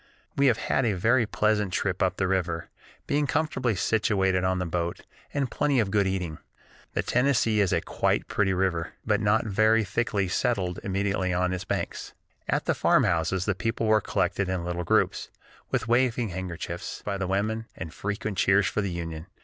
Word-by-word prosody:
We 140 0 +4
have 120 -3 +4
had 135 - 0
a 115 -4 +2
very 115 +5 +2
pleasant 105 -2 +1
trip 95 -2 -1
up 95 0 +1
the 95 - +1
river, 90 -4 -1 0.4
being 145 0 +1
comfortably 130 -7 0
situated 95 -2 +1
on 95 0 +1
the 90 - -1
boat, 85 0 -2 0.3
and 140 -4 -1
plenty 145 -3 +1
of 105 -4 +1
good 100 -1 +2
eating. 90 -5 -3 0.5
The - - 0
Tennessee 125 -4 +2
is 100 -3 +2
quite - - +1
a - - -36
pretty 95 -2 +1
river, 90 -3 -1
but 105 -2 +2
not 105 +2 +2
very 110 +2 +3
thickly 100 0 -1
settled 95 -3 0
immediately 95 -1 -1
on 90 +1 +1
its 95 +1 -4
banks. - - -3 0.4
At - - 0
the - - +2
farmhouses 90 +3 +2
the 100 - +1
people 115 +5 -2
were 110 0 +4
collected 100 0 0
in 90 -2 -2
little 90 0 -2
groups, - - +1 0.4
with - - -1
waving 120 -1 +2
handkerchiefs 90 -2 -5
by 100 - -2
the 95 - -1
women, 110 +4 -1
and 80 -1 -6
frequent 105 -1 -3
cheers 95 +1 +4
for 105 - 0
the 100 - -2
Union. 85 -1 -5
100 Hz, 180 wpm, -27 LUFS, 90-110 Hz, 0.5 s, We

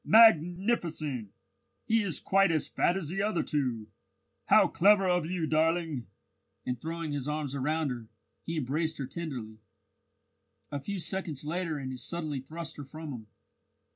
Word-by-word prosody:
"Magnificent! 175 - +4 0.6
He 225 0 +3
is 180 -8 -1
quite 195 -1 +4
as 155 -3 +1
fat 175 - +1
as 165 -6 -4
the 195 +3 -1
other 205 -4 +1
two. 125 -7 -1 0.6
How - - +7
clever 195 +1 +5
of 180 -3 +2
you, 175 -2 -1
darling!" 160 -4 +1 0.6
and 125 -2 -3
throwing 165 -1 -3
his 145 -1 -3
arms 150 -2 -2
round 150 +2 0
her, 120 -3 -6 0.4
he 165 0 -3
embraced 155 +4 -1
her 135 - -3
tenderly. 125 -7 -6 1.1
A 145 - -2
few 200 +6 -4
seconds 170 -6 -3
later 165 0 -1
and 135 -2 -4
he 130 - -5
suddenly 150 +2 -3
thrust 160 +4 -7
her 145 - -6
from 155 +2 -8
him. 110 -3 -8
155 Hz, 155 wpm, -30 LUFS, 140-175 Hz, 1.1 s, How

